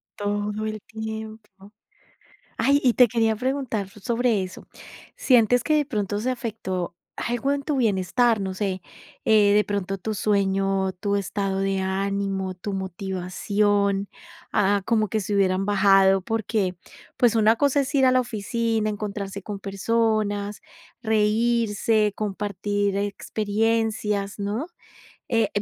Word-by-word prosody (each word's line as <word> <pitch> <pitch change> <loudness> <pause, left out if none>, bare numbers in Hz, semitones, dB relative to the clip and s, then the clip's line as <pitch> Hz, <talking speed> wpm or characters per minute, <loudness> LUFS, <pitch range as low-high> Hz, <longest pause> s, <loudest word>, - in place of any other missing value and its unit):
Todo 205 +1 -2
el 215 0 -3
tiempo. 220 -2 -8 0.9
Ay, 280 +1 +3
y 245 -3 +3
te 250 -1 +6
quería 225 -1 +1
preguntar 250 -5 -2
sobre 230 0 0
eso. 185 0 -8 0.5
¿Sientes 245 - +4
que 310 - +2
de 295 - +2
pronto 210 -6 -2
se 255 +3 -1
afectó 200 -8 -4 0.2
algo 240 +4 -1
en 285 0 -2
tu 290 -1 -1
bienestar? 220 +1 +2
No 190 -1 -3
sé, 190 -2 -2 0.4
eh, 210 -2 +5
de 210 0 +4
pronto 195 -1 -3
tú 215 +4 -3
sueño, 195 -1 +1
tú 200 -1 0
estado 195 0 -2
de 195 0 0
ánimo, 195 0 -2
tú 190 +3 -6
motivación, 195 +2 -1 0.4
ah, 200 0 +2
como 220 -2 +2
que 215 +3 -1
se 205 +1 -3
hubieran 195 0 +2
bajado, 195 -1 +5
porque 215 -3 -1 0.4
pues 240 -3 +3
una 220 +1 +4
cosa 285 +1 +2
es 275 0 -2
ir 265 -1 +5
a 255 - +5
la 255 - +4
oficina, 225 -1 -1
encontrarse 200 -2 -4
con 205 +1 -6
personas, 205 0 -1 0.4
reírse, 220 -1 +2
compartir 205 -1 -2
experiencias, 210 0 -1
¿no? 210 +9 -2 0.6
Eh, 225 -3 +2
210 Hz, 130 wpm, -24 LUFS, 195-225 Hz, 0.9 s, te